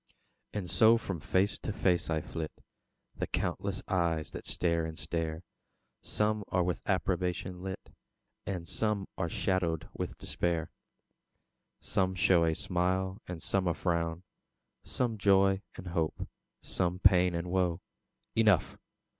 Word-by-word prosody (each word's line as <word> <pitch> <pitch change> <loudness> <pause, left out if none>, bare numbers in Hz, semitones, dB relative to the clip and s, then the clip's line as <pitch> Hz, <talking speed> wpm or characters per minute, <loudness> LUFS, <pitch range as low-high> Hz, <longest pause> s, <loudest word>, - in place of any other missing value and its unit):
And 100 -4 -3
so 110 +5 +6
from 95 -6 -4
face 95 +6 +1
to - - -3
face 90 -5 +1
I 80 -1 +1
flit, 80 0 -5 0.7
The - - -2
countless 100 -1 -2
eyes 85 -4 0
that - - -7
stare 85 -2 +1
and 80 0 -5
stare; 80 0 -2 0.6
Some 105 0 0
are 90 -1 +2
with 90 0 -1
approbation 90 -1 -1
lit, 95 0 -6 0.6
And 90 -4 -3
some 105 -3 0
are 85 -3 -1
shadowed 85 -4 0
with - - -4
despair. 85 -3 -1 1.1
Some 95 -1 0
show 90 -2 +4
a 80 -1 +1
smile 95 +4 0
and 90 -2 -6
some 95 -2 +1
a 85 - +1
frown; 85 -1 -1 0.6
Some 115 -4 -1
joy 95 -1 +4
and - - -8
hope, 80 -2 -1 0.4
some 90 0 0
pain 90 -2 +5
and 85 +1 -3
woe: 90 -2 +1 0.6
Enough! 110 -6 +3
90 Hz, 135 wpm, -31 LUFS, 85-95 Hz, 1.1 s, so